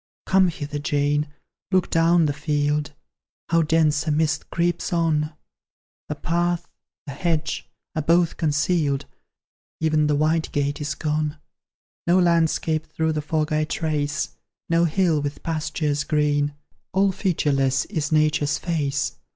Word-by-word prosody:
"Come 190 -1 +4
hither, 150 -3 -4
Jane, 145 +1 +1 0.4
look 185 -2 +2
down 165 0 +4
the 145 - 0
field; 150 0 0 0.6
How 165 0 +4
dense 155 -1 +2
a - - +2
mist 155 +1 0
creeps 170 0 -1
on! 160 -3 +1 0.8
The - - -2
path, 175 +1 -1 0.4
the 140 - -6
hedge, 160 +1 -2 0.3
are 155 - 0
both 170 +2 +3
concealed, 150 -2 +1 0.7
Ev'n 155 -1 +2
the 150 - +2
white 155 +2 +1
gate 145 +1 -1
is 145 - -2
gone 155 0 -1 0.7
No 175 +2 +5
landscape 165 -2 +2
through 160 0 -1
the 155 - -1
fog 155 +1 -1
I 155 0 +2
trace, 150 -1 -1 0.4
No 165 +1 +4
hill 165 -2 +2
with 145 0 -5
pastures 155 -2 -1
green; 145 -1 +1 0.4
All 195 +1 +3
featureless 140 -8 +1
is 150 -1 -3
Nature's 150 -1 +2
face. 145 -5 -1
155 Hz, 135 wpm, -23 LUFS, 150-165 Hz, 0.8 s, No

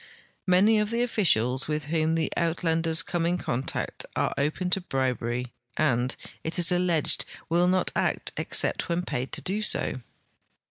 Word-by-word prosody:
Many 200 +4 +5
of 210 0 0
the 235 +1 0
officials 130 - +2
with 150 0 -2
whom 160 +1 0
the 165 -1 -1
Uitlanders 165 -2 +1
come 175 -2 -2
in 175 +1 +1
contact 130 -6 -3
are - - 0
open 155 +6 -1
to 190 - +2
bribery 125 -5 -2 0.2
and, 125 -4 +1 0.3
it 160 0 -3
is 175 +1 +4
alleged, 175 -3 +2 0.3
will 175 +2 +3
not 185 0 +1
act - - 0
except - - +1
when 170 +1 0
paid 130 -6 -3
to - - -3
do 200 +3 -2
so. 210 - 0
165 Hz, 155 wpm, -26 LUFS, 140-180 Hz, 0.3 s, Many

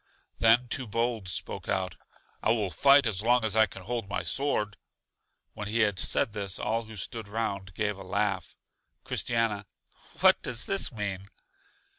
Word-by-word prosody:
Then 115 +2 +5
Too 125 +1 -2
bold 115 -1 -1
spoke 90 - -4
out: 95 -1 -1 0.5
I - - +1
will 105 -5 -1
fight 140 - +6
as 105 -4 +1
long 120 +1 +3
as 110 -1 0
I 110 -1 +5
can 95 0 -11
hold 115 -1 -3
my 100 - -2
sword. 135 -7 -1 0.8
When 105 - -6
he 115 +2 +1
had 105 -4 +2
said 105 - +2
this 100 -3 -3
all 115 +1 -1
who 110 0 -10
stood 110 +3 -5
round 100 -4 -3
gave 105 -2 -1
a - - -8
laugh. 95 -2 -1 0.5
Christiana: 115 -4 -1 0.5
'What - - +6
does 120 -2 -1
this 195 -5 +2
mean? 100 -4 -4
110 Hz, 165 wpm, -28 LUFS, 100-115 Hz, 0.8 s, fight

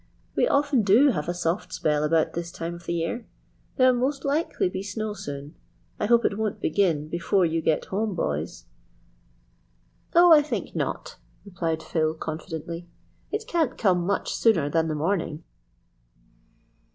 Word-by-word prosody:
"We - - +3
often 280 -3 +3
do 220 +8 +5
have 160 - -1
a - - 0
soft 175 +2 -2
spell 150 -1 0
about 160 +1 +2
this 170 0 -4
time 170 +1 -5
of 170 0 -12
the 170 - -1
year. 170 +8 -3 0.5
There'll 255 -1 +5
most 270 +3 -1
likely 290 - 0
be 185 +1 -4
snow 210 +2 -4
soon. 145 -6 -7 0.5
I - - 0
hope 235 +1 +4
it 200 - 0
won't 215 -2 -2
begin 160 -3 +1
before 175 +3 +1
you 165 0 0
get 155 -1 +1
home, 205 0 -2
boys." 75 - -3 1.5
"Oh, 345 0 +8
I 300 - +8
think 295 - -4
not," - - -3 0.3
replied 165 -4 -3
Phil 155 -1 0
confidently. 160 +2 -6 0.4
"It 430 +1 -2
can't 335 - 0
come 185 -5 +2
much 200 +3 -1
sooner 165 -11 +2
than 165 0 +2
the 155 - -2
morning." 160 -1 -1
175 Hz, 155 wpm, -25 LUFS, 160-225 Hz, 1.5 s, Oh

